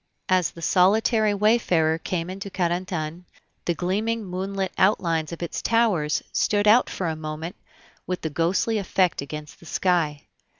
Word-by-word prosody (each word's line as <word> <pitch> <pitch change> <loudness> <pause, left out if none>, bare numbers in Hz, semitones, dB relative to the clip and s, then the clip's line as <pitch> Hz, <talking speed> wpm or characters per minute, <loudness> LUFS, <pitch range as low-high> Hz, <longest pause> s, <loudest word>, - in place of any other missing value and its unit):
As 185 -3 +3
the 170 - -12
solitary 210 +4 +3
wayfarer 185 -7 +2
came 175 0 -3
into 195 +1 -6
Carentan, 175 -2 -2 0.4
the 170 - 0
gleaming 215 +6 -1
moonlit 190 +1 -3
outlines 165 -5 +2
of 170 +1 -6
its 170 - -4
towers 205 -11 +1
stood 205 0 +2
out 225 +4 +6
for 180 - -3
a 160 - -1
moment 155 +4 -6 0.5
with 165 -4 -3
ghostly 185 +7 +1
effect 185 -4 +1
against 150 +1 -8
the 170 - -15
sky. 160 -7 0
180 Hz, 140 wpm, -24 LUFS, 165-200 Hz, 0.5 s, out